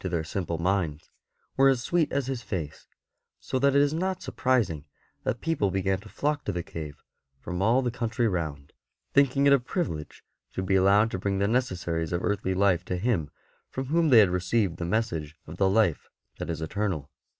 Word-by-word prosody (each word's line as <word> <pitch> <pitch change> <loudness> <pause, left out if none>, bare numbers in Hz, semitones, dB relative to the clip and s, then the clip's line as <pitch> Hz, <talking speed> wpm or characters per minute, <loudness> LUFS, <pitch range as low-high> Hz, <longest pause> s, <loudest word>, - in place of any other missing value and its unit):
BENEDICT 95 -2 -4
37 - - +2
their 80 - -2 0.2
simple 85 -1 -3
minds, 85 -4 -1 0.4
were 135 0 +6
as 130 -2 +1
sweet 170 -3 +1
as 140 -2 0
his 130 -2 -3
face, 90 -9 -5 0.5
so 100 - -2
that 140 +1 +3
it 140 - +6
is 145 +1 +1
not 185 +3 -1
surprising 120 - 0 0.4
that 115 - -2
people 165 -12 +1
began 95 0 0
to 105 +2 -13
flock 145 +4 -1
to - - -2
the 90 -2 -3
cave 75 -4 -8 0.4
from 90 +6 -4
all 120 +6 +3
the 120 - 0
country 120 0 -1
round, 75 -7 -3 0.4
thinking 140 0 +4
it 140 - +7
a 140 - +5
privilege 120 - -4 0.3
to 95 - -3
be 95 - 0
allowed 100 +4 +4
to 95 - -3
bring 100 +1 -1
the 100 +1 +1
necessaries 90 -9 -1
of 85 0 -1
earthly 100 -2 0
life 95 -3 +3
to 90 0 -3
him 90 -7 0 0.4
from 130 - -4
whom 165 -2 +3
they 125 - +7
had 100 -5 +7
received 90 0 0
the 85 - -3
message 85 -7 -1
of 80 +3 -9
the 95 0 +3
life 100 -5 +2 0.3
that - - -4
is 80 -1 -3
eternal. 85 -4 -2
100 Hz, 205 wpm, -27 LUFS, 85-125 Hz, 0.5 s, it